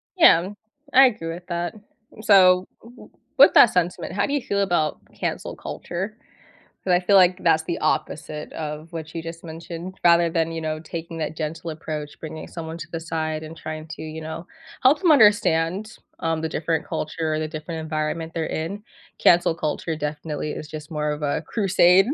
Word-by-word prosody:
Yeah. 190 - +6 0.4
I 270 +1 +9
agree 165 -8 -4
with 175 +1 -10
that. 175 -1 -2 0.5
So, 185 -3 +6 0.2
w 240 +2 -15
w - - -14 0.3
with - - +8
that 235 - +8
sentiment, 180 0 -1
how 200 - +1
do 285 - -3
you 285 - +1
feel 200 -3 -1
about 175 -6 +1
cancel - - -4
culture? 195 +5 -5 0.7
'Cause 185 - +2
I 175 - +5
feel 195 +2 +5
like 185 0 +4
that's 160 -2 +4
the 170 +1 -3
opposite 155 -1 -2
of 155 +1 -6
what 160 -1 -6
you 165 - -4
just 165 0 -8
mentioned 170 +2 -7
rather 170 0 +5
than, 165 0 0
you 165 - -4
know, 155 0 -2
taking 165 +1 -7
that 155 0 -3
gentle 160 +2 -4
approach, 155 -1 -6
bringing 155 0 -7
someone 165 -1 -7
to 165 - -8
the 165 - -4
side, 160 -1 -3
and 160 +1 -9
trying 155 -1 -6
to, - - -8
you 160 0 -7
know, 160 +3 -7 0.4
help 275 +4 +6
them 345 -4 +5
understand, 205 - +3 0.2
um, 165 -1 -1
the 160 - -1
different 160 0 -1
culture 155 +1 -2
or 155 - -1
the 155 - -2
different 160 +1 -6
environment 155 +1 -3
they're 165 -1 -1
in. 170 +6 -4 0.4
Cancel 175 -1 +5
culture 160 +1 -2
definitely 150 0 -4
is 150 - -7
just 155 -1 -8
more 150 -1 -1
of 150 - -4
a 145 - 0
crusade 190 -2 +4
165 Hz, 190 wpm, -23 LUFS, 155-180 Hz, 0.7 s, I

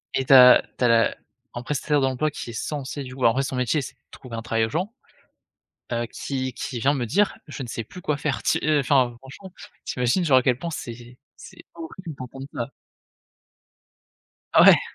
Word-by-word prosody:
et 130 - 0
tu 135 - +4
as 125 -1 +9 0.2
tu 125 - +1
as - - +5
la 115 -1 +3 0.4
un 120 - -4
prestataire 145 +2 0
d'emploi 135 +3 0
qui 120 - -7
est - - -11
censé 140 +2 -4
du 130 0 -9
coup 130 - -1
en 115 - +5
vrai 135 +2 0
son 135 - -4
métier, 125 +4 0
c'est - - -8
de - - -42
trouver 125 -4 -10
un 115 - -4
travail 110 0 0
aux - - -5
gens, 180 - -2 1.0
heu, 120 0 -1
qui 130 -1 -4
qui 120 -1 -5
vient 140 +4 +2
me 125 -4 -2
dire: 195 - +1
«Je 145 -2 -7
ne - - -7
sais 115 - -4
plus 180 - -11
quoi 150 -2 -1
faire». 150 -2 -2
Tu, - - +2
heu 150 -1 +3
enfin 130 -3 +2
franchement, 140 +8 -12 0.3
tu - - -5
imagines 125 +9 +2
genre 135 -4 +5
à - - +5
quel 125 -2 +2
point, 170 +4 -5
c'est 120 -3 -8 0.2
c'est - - -14
horrible 165 -1 -8
d'entendre 135 +2 -8
ça? 120 - -4 1.8
Ah - - +7
ouais. - - +8
130 Hz, 215 wpm, -24 LUFS, 120-145 Hz, 1.8 s, as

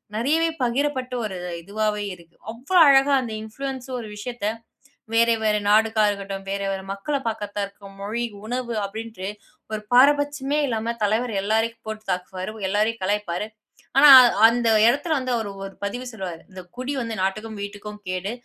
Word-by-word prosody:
நிறையவே 315 +8 +2
பகிரப்பட்ட 255 0 -1
ஒரு 195 -3 -5 0.3
இதுவாவாவே 210 +2 -2
இருக்கு. 170 -1 -20 0.2
அவ்வளவு 275 +11 +1
அழகா 275 0 +5
அந்த 230 -3 -5
இன்ஃப்ளூயன்ஸர் 260 +2 -5
ஒரு 215 - -8
விஷயத்தை 215 0 -3 0.6
வேறு 230 0 +4
வேறு 210 -1 +2
நாடுகாரர்ரா 215 0 +4
இருக்கட்டும், 195 -1 -6
வேறு 200 0 -2
வேறு 190 0 -4
மக்களை 275 +8 -2
பார்க்கர்தா 205 -2 -3
இருக்கும் 200 0 -15
மொழி 230 +4 -2 0.2
உணவு 245 0 -3
அப்படின்ட்டு 215 -2 -6 0.5
ஒரு 215 - -2
பாரபட்சம் 285 +1 +4
இல்லாம 230 0 -2
தலைவர் 220 +2 0
எல்லோரையும் 225 +2 -1
போட்டு 220 0 -6
தாக்குவார், 185 +2 -4 0.2
எல்லாரையும் 215 +2 0
கலாய்ப்பார். 205 -1 -1 0.5
ஆனா 290 +1 +9 0.4
அந்த 235 0 +1 0.2
இடத்தில 290 +6 +2
வந்து 255 -1 -3
அவர் 220 - -3 0.2
ஒரு 195 - -10
பதிவு 245 +5 -4
சொல்லுவார். 185 -6 -6
இந்த 185 0 -9 0.2
குடி 255 +3 -3
வந்து 230 -1 -4
நாட்டுக்கும் 215 +2 -3
வீட்டுக்கும் 205 +1 -7
கேடு. 185 +3 -3
220 Hz, 150 wpm, -23 LUFS, 205-250 Hz, 0.6 s, ஆனா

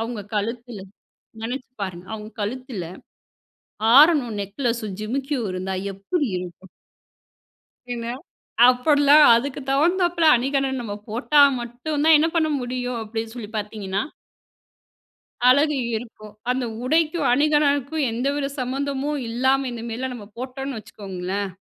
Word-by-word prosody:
அவுங்க 225 -2 -4
கழுத்துல, 230 +1 -3 0.6
நெனச்சு 250 +3 -5
பாருங்க, 180 -2 -7
அவுங்க 215 0 -7
கழுத்துல 230 -3 -4 1.1
ஆரமும் 285 -8 +5
நெக்லஸும், 215 -1 -3
ஜிமிக்கியும் 260 +1 -2
இருந்தா 185 +1 -3 0.2
எப்புடி 265 - -2
இருக்கும்? 180 +1 -9 1.3
என்ன, 235 -1 -5 0.6
அப்படிலாம் 285 +3 +5
அதுக்கு 265 +4 -2
தகுந்தாப்பில 340 +4 +2
அணிகலன் 270 +1 0
நம்ம 210 -3 -5 0.2
போட்டா 275 +6 +3 0.2
மட்டும் 245 +6 -4
தான் 320 0 +8
என்ன 320 +2 +2
பண்ண 315 -2 +2
முடியும், 245 -1 -3
அப்படின்னு 225 +1 -5
சொல்லி 225 -4 -7
பாத்தீங்கன்னா 205 -2 -3 1.5
அழகு 290 +3 +4 0.2
இருக்கும். 215 -2 -8 0.2
அந்த 255 0 -1 0.2
உடைக்கும் 310 +3 +1
அணிகலனுக்கும் 290 +1 +2
எந்தவித 275 +4 -1
சம்மந்தமும் 275 +3 -2
இல்லாம 260 +3 +1
இந்தமாரிலாம் 240 +2 -5
நம்ம 215 -4 -9
போட்டோன்னு 265 +1 -5
வச்சுக்கோங்களேன், 195 -1 -5
250 Hz, 110 wpm, -23 LUFS, 220-280 Hz, 1.5 s, தான்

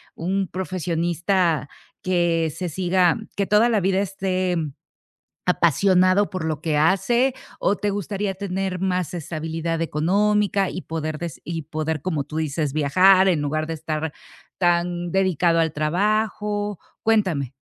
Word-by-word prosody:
un 190 +3 -1
profesionista 175 -2 0 0.3
que 170 -3 +1
se 180 +1 -3
siga 180 +1 +2 0.2
que 200 - +1
toda 215 +3 +4
la 220 -3 +2
vida 190 +1 +1
esté 185 -2 -1 0.9
apasionado 185 +3 +3
por 185 -4 -4
lo 155 -1 -2
que 155 -3 0
hace 235 - +2 0.3
o 205 - +2
te 205 +2 -1
gustaría 200 0 -2
tener 190 -1 -3
más 180 -4 -1
estabilidad 165 0 -3
económica 200 +5 +1
y 180 - -5
poder 155 -1 -4
des 170 -4 -6
y 165 -1 -4
poder, 155 0 -3
como 160 -6 -1
tú 155 +2 -8
dices 150 -2 -1
viajar 185 +6 +5
en 165 -5 +2
lugar 155 +2 -1
de 165 - -4
estar 155 0 -3 0.5
tan 175 -1 +1
dedicado 180 -3 +2
al 160 -1 +1
trabajo, 205 +5 0 0.2
cuéntame. 185 - +1
180 Hz, 135 wpm, -23 LUFS, 160-195 Hz, 0.9 s, viajar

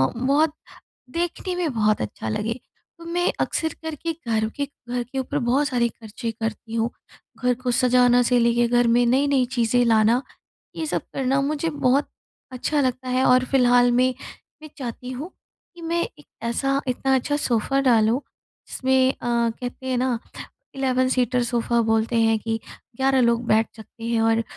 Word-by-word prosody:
बहुत 285 +5 +2 0.6
देखने 350 +3 -3
में 335 -6 -1
बहुत 215 -1 +2
अच्छा 110 +1 -5
लगे। 210 - -1 0.5
तो 335 - -12
मैं 350 +1 0
अक्सर 320 -1 -1
करके 320 +1 -4
घर 220 -1 +1
के 285 - 0 0.2
घर 245 0 -1
के 265 +3 -6
ऊपर 280 +3 -2
बहुत 265 +4 +1
सारे 240 -2 +1
ख़र्चे 225 +1 -7
करती 225 0 -5
हूँ। 230 +1 0 0.5
घर 250 0 +3
को 250 - 0
सजाने 245 0 +4
से 245 0 +3
लेकर 235 0 +2
घर 240 -1 +4
में 240 +1 +4
नई-नई 270 +1 +3
चीज़ें 240 +1 +2
लाना 225 +2 +3 0.5
ये 320 - -3
सब - - -1
करना 270 +1 +1
मुझे 305 +3 -1
बहुत 280 -1 +1 0.4
अच्छा 285 +4 -1
लगता 255 -1 -1
है 255 +1 +1
और 255 0 +5
फिलहाल 245 -1 +5
में 255 +1 +3 0.5
मैं 310 - -9
चाहती 250 0 -6
हूँ 285 +8 -6 0.4
कि 340 - -12
मैं 340 +1 0
एक 295 - -8 0.2
ऐसा, 270 +4 0
इतना 265 +2 +1
अच्छा 290 +3 0
सोफ़ा 270 +1 0
डालूँ 235 -1 +3 0.5
जिसमें 260 0 +2
अ, - - -21
कहते 240 +2 -2
है 255 -1 0
ना 250 -2 0 0.6
11 255 -1 +1
सीटर 250 0 +1
सोफा 235 0 0
बोलते 225 +1 +1
हैं 225 -1 +3
कि 225 +1 -2 0.4
11 265 0 +2
लोग 235 0 +2
बैठ 220 +1 +3
सकते 225 +1 -12
हैं 230 -1 0
और 225 0 +3
250 Hz, 170 wpm, -23 LUFS, 235-270 Hz, 0.6 s, और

